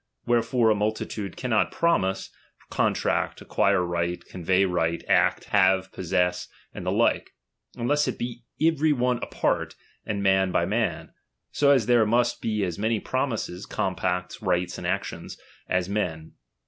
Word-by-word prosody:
Wherefore 120 -1 +2
a - - +3
multitude 105 -2 -3
cannot 120 -4 +1
promise, 95 - 0 0.4
contract, - - 0
acquire 100 -2 +1
right, 85 0 -2
convey 95 +2 +1
right, 85 -2 -1
act, - - +3
have, 95 -1 +3
possess, 90 0 -1 0.3
and - - -7
the - - +2
like, - - +1 0.4
unless 145 +5 +1
it - - -2
be 120 0 -5 0.2
every 160 -1 +3
one 125 -2 +1
apart, - - -1 0.3
and 100 -1 -3
man 95 -1 +3
by - - +2
man; - - -2 0.4
so 145 - +2
as 135 -6 +4
there 120 -2 +4
must 120 +2 +1
be 105 -2 -1
as 90 -2 -3
many 110 +1 +1
promises, 115 -9 -3
compacts, 90 -2 -2
rights, 90 -3 -1
and 85 - -4
actions, 95 +2 -4 0.3
as 90 -1 +1
men. 90 -6 -3
100 Hz, 145 wpm, -25 LUFS, 90-120 Hz, 0.4 s, as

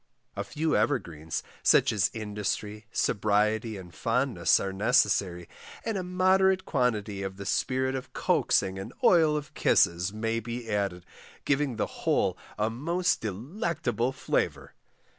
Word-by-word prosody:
A - - -2
few 155 0 -1
evergreens, 85 - -1 0.2
such - - +5
as 100 -2 +2
industry, 105 0 -4
sobriety, 105 +2 +1
and 90 -2 -11
fondness, 115 -6 +2
are 95 -1 -3
necessary, 95 -4 +2 0.4
and 225 - -1
a 190 - -1
moderate 185 +1 +2
quantity 110 -7 0
of 95 0 -5
the 100 - -7
spirit 130 +4 0
of 130 -1 -5
coaxing 95 0 +1
and 95 - -7
oil 160 -4 +5
of 150 -1 -7
kisses 85 +3 +3
may 115 +2 -1
be 120 +1 -6
added, 100 -4 -1 0.4
giving 140 -3 +1
the 110 - 0 0.2
whole - - +2 0.2
a 110 +1 0
most 170 +9 0
delectable 125 - -2
flavour. 135 - -2
115 Hz, 135 wpm, -28 LUFS, 100-145 Hz, 0.4 s, such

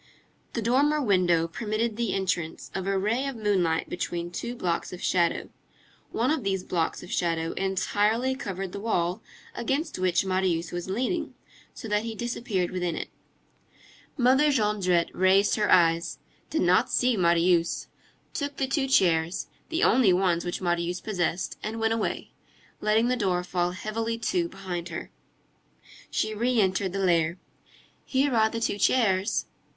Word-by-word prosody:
The 230 - -2
dormer 285 +6 +3
window 180 - +2
permitted 215 +4 -2
the 230 -3 -1
entrance 180 -4 -2
of 190 0 -3
a 195 0 +1
ray 225 +8 0
of 275 - -4
moonlight 190 -7 +1
between 175 -1 -4
two 235 +7 -4
blocks 175 -7 -2
of 180 - -7
shadow. 170 -2 +1 0.6
One 240 +5 +1
of 310 -6 0
these 190 -2 -1
blocks 165 -2 -2
of - - -10
shadow 165 -2 0
entirely 205 +6 0
covered 195 -7 -5
the 200 - -6
wall 180 -5 -1 0.3
against 270 - -2
which 180 -1 +2
Marius 185 -3 0
was 175 +1 -5
leaning, 260 - -2 0.4
so - - -7
that 210 0 +1
he 225 0 -5
disappeared 220 -6 -2
within 180 -2 -2
it. - - -5 1.1
Mother 265 +4 +4
Jondrette 205 -8 +1
raised 190 +2 +4
her 210 -1 +1
eyes, 165 -1 +3 0.3
did 320 - 0
not 185 +7 +3
see 250 -1 +2
Marius, 170 -2 +2 0.5
took 285 -1 -3
the 270 - +1
two 270 +1 0
chairs, 170 -8 +2 0.2
the 330 +2 0
only 235 -5 +5
ones 180 -2 +2
which 175 +1 -4
Marius 175 0 -1
possessed, 180 -3 -2
and 220 +1 -4
went 225 0 +2
away, 225 - -3 0.5
letting 215 +2 +2
the 250 - +2
door 185 -6 0
fall 175 -1 0
heavily 225 +5 -3
to 340 +9 -1
behind 180 - -5
her. 170 - -6 1.0
She 215 - -1
re 240 +3 +1
entered 190 -1 +1
the 195 0 -1
lair. 170 -1 +2 0.7
"Here 270 0 +1
are 220 -1 +4
the 230 - -4
two 215 -2 -1
chairs." 200 -5 +2
195 Hz, 155 wpm, -27 LUFS, 175-230 Hz, 1.1 s, only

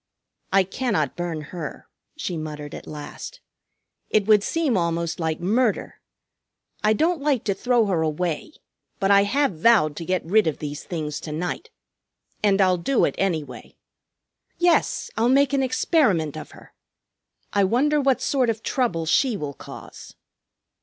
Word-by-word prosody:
"I 195 0 +5
cannot 190 - -1
burn 175 -3 -3
her," 165 -5 -6 0.3
she 180 - -3
muttered 150 -2 -6
at - - -9
last. 150 - -8 0.7
"It 210 -2 +2
would 210 -1 +5
seem 310 +2 0
almost 170 -2 -1
like 160 -1 -1
murder. 215 +5 0 0.8
I 215 +1 +4
don't 320 +6 +1
like 280 -5 +1
to 200 - 0
throw 240 +3 +2
her 185 -5 0
away, 160 - -2 0.5
but 195 +1 +2
I 200 0 +6
have 240 - 0
vowed 180 -8 +4
to 165 - -5
get 185 -1 -1
rid 205 +3 +3
of 155 - -1
these 150 0 -6
things 150 -4 -4
to 155 - -7
night. 180 - -4 0.7
And 200 -2 +3
I'll 185 -1 +4
do 245 +10 +2
it, - - -1
anyway. 165 -7 -3 0.8
Yes, 345 -1 +2
I'll 230 +2 +3
make 280 +1 +4
an 275 - +2
experiment 245 - +1
of 155 - -8
her. - - -16 0.8
I 200 - +3
wonder 285 +9 +2
what 270 -2 +2
sort 260 -4 +1
of 225 -1 -2
trouble 225 -11 0
she 235 - +2
will 145 -4 -5
cause." - - -11
195 Hz, 155 wpm, -23 LUFS, 160-250 Hz, 0.8 s, I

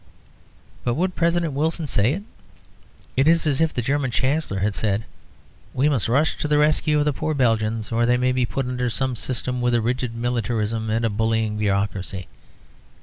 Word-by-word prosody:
But 120 -1 0
would 185 +4 0
President 170 -2 +1
Wilson 160 +3 -1
say 120 -2 +2
it? 195 +5 -5 0.9
It 135 +3 +3
is 165 0 +4
as 145 -1 +1
if 160 -1 +3
the 120 - -2
German 140 +1 0
Chancellor 130 -1 0
had 100 +2 0
said, 105 +1 -1 0.7
"We 140 +4 +3
must 125 -8 +1
rush 145 +6 +2
to - - -2
the 150 0 +3
rescue 150 0 +2
of 145 - +2
the 150 - +1
poor 155 +3 -2
Belgians, 115 -3 0
or 120 +1 +2
they 125 0 +4
may 125 +1 +2
be 125 0 +1
put 135 +2 -2
under 125 0 -1
some 130 +2 -1
system 125 +1 -3
with 120 0 +2
a - - +3
rigid 120 0 -2
militarism 115 -2 -1
and 115 +1 +1
a - - +2
bullying 110 0 0
bureaucracy." 100 -2 -1
125 Hz, 190 wpm, -23 LUFS, 110-145 Hz, 0.9 s, is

